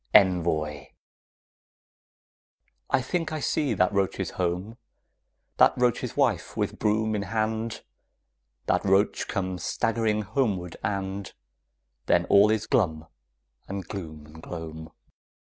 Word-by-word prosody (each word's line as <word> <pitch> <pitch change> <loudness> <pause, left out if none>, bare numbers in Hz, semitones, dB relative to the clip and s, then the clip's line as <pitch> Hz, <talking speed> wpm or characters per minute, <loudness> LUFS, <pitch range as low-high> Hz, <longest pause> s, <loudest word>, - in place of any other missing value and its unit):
ENVOI 85 -7 +3 2.0
I - - +3
think 165 +5 -2
I 155 - -2
see 145 +1 0
that 90 +2 +2
roach's 100 -1 0
home, 90 +5 -2 0.8
That - - +6
roach's 125 -2 0
wife, - - +1
with - - -2
broom 110 +1 +1
in 105 - -1
hand, 110 +2 -2 0.8
That - - +1
roach 100 +1 +2
come 95 -3 -2
staggering 110 +3 0
homeward 100 -6 -1
and 100 0 -3 0.8
Then - - +3
all 100 +1 +7
is 110 0 +1
glum 80 -8 +1 0.6
and 95 -2 -5
gloom 80 -6 -7
and 80 +1 -13
gloam. 80 -2 -7
100 Hz, 110 wpm, -27 LUFS, 85-110 Hz, 2.0 s, all